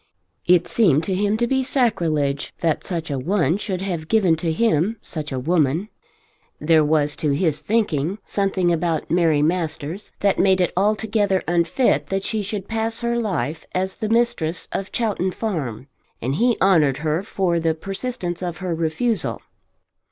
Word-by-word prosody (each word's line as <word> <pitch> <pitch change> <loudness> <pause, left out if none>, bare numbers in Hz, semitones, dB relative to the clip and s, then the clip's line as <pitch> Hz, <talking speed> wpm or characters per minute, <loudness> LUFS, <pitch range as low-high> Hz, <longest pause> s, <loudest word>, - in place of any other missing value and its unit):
It 175 -1 +4
seemed 165 - +3
to 190 - -2
him 205 +3 +1
to 240 - +1
be 265 +2 +1
sacrilege 165 - 0
that 165 -3 0
such 165 -4 -4
a 135 - -1
one 170 +2 +1
should 190 -3 -4
have 170 -5 -3
given 190 -4 +3
to 165 0 -1
him 195 +2 +1
such 155 -7 -6
a 130 - -2
woman. 160 +6 +1 0.7
There 155 0 +4
was, 150 -1 +1
to 150 - 0
his 155 0 0
thinking, 195 -6 0
something 190 -3 +1
about 165 -2 -1
Mary 160 -4 +3
Masters 165 +2 -2
that 200 -1 +2
made 190 -1 +4
it 180 - +1
altogether 205 0 +1
unfit 170 - +2
that 195 +3 -2
she 220 -1 -1
should 200 -1 -4
pass 225 +1 -2
her 235 0 0
life 165 -8 -2
as 190 +1 0
the 215 -2 -4
mistress 230 -8 +1
of 195 - -4
Chowton 210 -5 0
Farm, 150 - -3 0.3
and 130 +4 -2
he 235 - +2
honoured 155 -8 +4
her 155 +3 +1
for 190 -4 0
the 165 -1 +1
persistence 195 0 -4
of 175 -2 -3
her 185 -2 -3
refusal. 165 +6 -1
180 Hz, 165 wpm, -22 LUFS, 160-210 Hz, 0.7 s, It